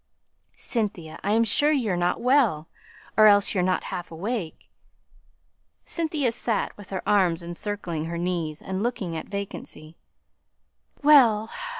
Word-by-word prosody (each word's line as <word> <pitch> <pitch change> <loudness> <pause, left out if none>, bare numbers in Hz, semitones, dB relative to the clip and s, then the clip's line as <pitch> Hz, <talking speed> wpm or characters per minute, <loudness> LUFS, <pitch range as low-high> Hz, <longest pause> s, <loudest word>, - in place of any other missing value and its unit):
"Cynthia, 190 -9 -3
I 205 - +1
am 225 +1 +4
sure 290 +7 +3
you're 235 -11 0
not 175 0 0
well, 240 - +2 0.5
or 215 +2 +7
else 205 -1 +4
you're 190 - +1
not 185 0 0
half 175 - -5
awake." 185 +1 -5 1.2
Cynthia 310 -7 -1
sate 230 -2 -2
with 205 -2 -13
her 190 -2 -5
arms 180 -4 +2
encircling 175 -2 -4
her 170 +1 -4
knees, 170 -3 -3
and 190 0 -3
looking 210 -8 -2
at 160 - -5
vacancy. 190 -5 -7 1.1
"Well!" 235 -7 +5
200 Hz, 130 wpm, -25 LUFS, 170-230 Hz, 1.2 s, or